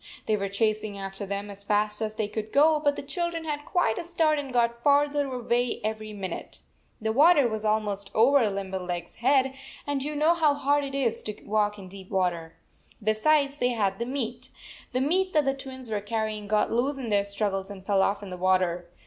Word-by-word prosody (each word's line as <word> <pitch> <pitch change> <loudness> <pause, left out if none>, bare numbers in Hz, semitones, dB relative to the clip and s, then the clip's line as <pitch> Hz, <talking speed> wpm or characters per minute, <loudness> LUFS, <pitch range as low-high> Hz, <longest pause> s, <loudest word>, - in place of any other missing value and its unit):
They 215 - +2
were 200 -1 -2
chasing 215 0 0
after 195 +1 -6
them 200 +1 -4
as 200 0 -11
fast 210 +1 +1
as 215 0 -2
they 215 -1 -1
could 215 0 -5
go, 305 +2 +5
but 290 -1 +1
the - - -6
children 335 +3 -3
had 300 -2 -2
86 295 - -17
quite 350 -12 +2
a - - -4
start 325 -3 +1
and 275 -2 -5
got 235 -1 +1
farther 285 0 +3
away 245 -1 0
every 215 0 -3
min 195 -3 -5
ute. - - -7 0.4
The 220 0 -1
water 295 0 +6
was 220 -1 -4
almost 210 -2 -1
over 240 0 +5
Limber 195 -1 -4
leg 175 -1 -3
s - - -16
head, 265 +2 +3 0.3
and 285 -2 -1
you 300 +1 -3
know 310 +3 +4
how 310 -4 +3
hard 285 0 +1
it 275 -1 -5
is 235 -4 0
to 210 - -6
walk 210 0 +1
in 195 -2 -10
deep 190 0 -11
water. 175 -4 -1 0.5
Besides, 280 +7 +2
they 245 0 +2
had 200 -3 0
the 235 - -2
meat. 250 -3 -4 0.4
The 255 0 0
meat 370 +7 +1
that 300 -2 +3
the 270 - +2
Twins 265 -2 -6
were 210 -2 -2
carry 220 +1 -2
ing 210 -1 -8
got 210 0 +1
loose 265 +5 0
in 250 -4 -5
their 200 -1 +3
struggles 200 -1 -2
and 190 -2 -10
fell 195 -2 +3
off 200 +2 0
in 195 - -8
the 180 - -5
water. 180 -1 +1
220 Hz, 225 wpm, -27 LUFS, 200-280 Hz, 0.5 s, water